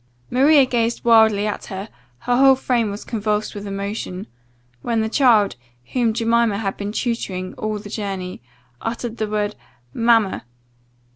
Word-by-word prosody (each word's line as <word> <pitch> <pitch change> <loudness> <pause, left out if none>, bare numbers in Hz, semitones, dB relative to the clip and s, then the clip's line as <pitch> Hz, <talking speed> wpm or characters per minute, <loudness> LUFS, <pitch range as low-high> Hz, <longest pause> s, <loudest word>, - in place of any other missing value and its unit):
"Maria 275 +2 +5
gazed 235 -2 -1
wildly 220 -3 +5
at 210 - -3
her, 195 +1 -6 0.3
her 245 - +1
whole 270 +1 +6
frame 245 -4 0
was 205 +1 -7
convulsed 210 -1 -2
with 205 0 -7
emotion; 200 -1 -4 0.6
when 230 -2 0
the 220 - 0
child, 220 - +3 0.4
whom 240 -3 +2
Jemima 230 -1 +1
had 200 -2 -2
been 205 0 -4
tutoring 200 -6 -3
all 215 0 -3
the 205 0 -9
journey, 195 - -5 0.4
uttered 235 0 -4
the 215 - -1
word 210 0 -1 0.4
'Mamma! 230 - +2
220 Hz, 145 wpm, -21 LUFS, 205-235 Hz, 0.6 s, whole